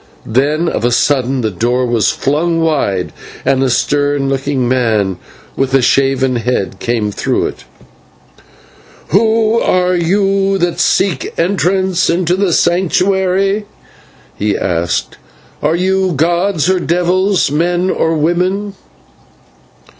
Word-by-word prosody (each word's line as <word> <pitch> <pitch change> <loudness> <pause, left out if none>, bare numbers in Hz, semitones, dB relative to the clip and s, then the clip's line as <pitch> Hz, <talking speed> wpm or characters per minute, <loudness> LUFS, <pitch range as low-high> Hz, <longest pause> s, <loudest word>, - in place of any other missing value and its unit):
Then 150 +8 0
of 115 - -2
a 120 - +2
sudden 130 0 +1
the 110 -2 -1
door 120 +7 0
was 120 -3 +1
flung 165 +4 0
wide, 140 - -1 0.3
and 135 -1 +2
a 135 - +2
stern 145 +2 0
looking 135 -2 -1
man 110 -7 0 0.4
with 135 0 0
a 135 - +4
shaven 135 -1 +2
head 105 -6 -2
came 115 -3 -1
through - - -1
it. - - -7 1.4
"Who 220 +4 +2
are 180 0 +1
you 195 +2 +1
that 175 -2 -1
seek 185 -9 +1
entrance 185 0 +1
into 175 0 +1
the 195 -1 0
Sanctuary?" 190 +3 +1 0.7
he 105 0 -1
asked; 85 -2 -2 0.4
"are 155 +2 +1
you 190 +1 0
gods 170 +3 0
or 185 0 +2
devils, 180 +1 +1
men 175 +4 0
or 165 0 0
women?" 180 +6 -1
165 Hz, 120 wpm, -14 LUFS, 130-185 Hz, 1.4 s, a